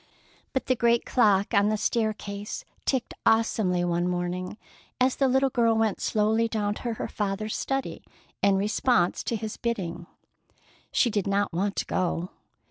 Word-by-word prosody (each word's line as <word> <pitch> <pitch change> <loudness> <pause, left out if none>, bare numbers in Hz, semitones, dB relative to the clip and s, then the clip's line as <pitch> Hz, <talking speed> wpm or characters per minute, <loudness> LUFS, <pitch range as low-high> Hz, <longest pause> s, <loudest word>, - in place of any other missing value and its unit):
But 265 - -1
the 255 - +2
great 235 0 +2
clock 205 -4 +3
on 200 0 +4
the 215 - +1
staircase 210 -2 -2 0.2
ticked 265 -3 0
awesomely 220 -5 +2
one 175 0 0
morning 180 +2 -3 0.4
as 255 0 +3
the 270 - +2
little 265 +1 +2
girl 230 -2 +3
went 220 -3 +1
slowly 220 +2 +2
down 210 -2 -1
to 235 +2 -4
her - - -4
father's 210 +1 -2
study 270 0 -3 0.4
in 200 -1 +4
response 205 -1 +2
to 235 - -1
his 220 -1 -5
bidding. 175 -7 -3 0.8
She 240 - +3
did 205 -2 -1
not 200 -1 0
want 195 +4 -1
to - - -1
go. 180 -1 -1
210 Hz, 155 wpm, -27 LUFS, 195-235 Hz, 0.8 s, on